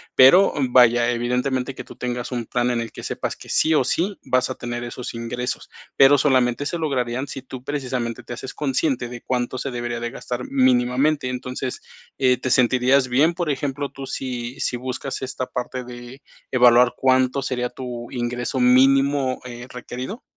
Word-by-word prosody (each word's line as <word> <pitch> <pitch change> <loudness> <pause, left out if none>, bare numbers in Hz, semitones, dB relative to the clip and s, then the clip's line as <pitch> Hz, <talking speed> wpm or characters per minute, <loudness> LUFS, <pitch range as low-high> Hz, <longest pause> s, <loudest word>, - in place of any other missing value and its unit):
pero, 175 +10 +7 0.2
vaya, 120 -1 +5
evidentemente 125 +2 -1
que - - -7
tú - - -14
tengas 125 0 -4
un 120 -2 -3
plan 120 +2 0
en 120 - 0
el 115 - -5
que - - -9
sepas - - -3
que - - -14
sí 160 - +3
o 150 - +4
sí 180 +10 -1
vas 130 0 +1
a 130 - -3
tener 120 0 -5
esos 120 0 -6
ingresos, 120 +2 -4 0.3
pero 140 +1 +7
solamente 130 -1 +2
se 170 - -2
lograrían 130 -3 -1
si 135 - -7
tú 130 -1 -10
precisamente 125 -5 -3
te - - -11
haces 125 +2 -6
consciente 135 -3 -1
de 120 -1 -8
cuánto 125 0 -2
se 135 - -4
debería 120 -1 -3
de 120 - -3
gastar 125 -1 -5
mínimamente. 130 +2 +2
Entonces, 125 0 -4 0.4
eh, 125 -2 +3
¿te 130 - -3
sentirías 130 +1 +3
bien, 145 +7 +3
por 170 -2 -2
ejemplo, 140 0 -2
tú, 135 0 -8
sí 125 -1 -5
sí 125 - -1
buscas 130 +2 -5
esta 130 -1 -4
parte 125 +1 -4
de 120 +2 -10 0.3
evaluar 125 -1 +5
cuánto 130 +1 +2
sería 125 -2 -2
tu 120 -2 -7
ingreso 125 +1 -2
mínimo, 135 +1 +4
eh, 120 0 -8
requerido? 125 - -7
125 Hz, 175 wpm, -22 LUFS, 120-135 Hz, 0.4 s, pero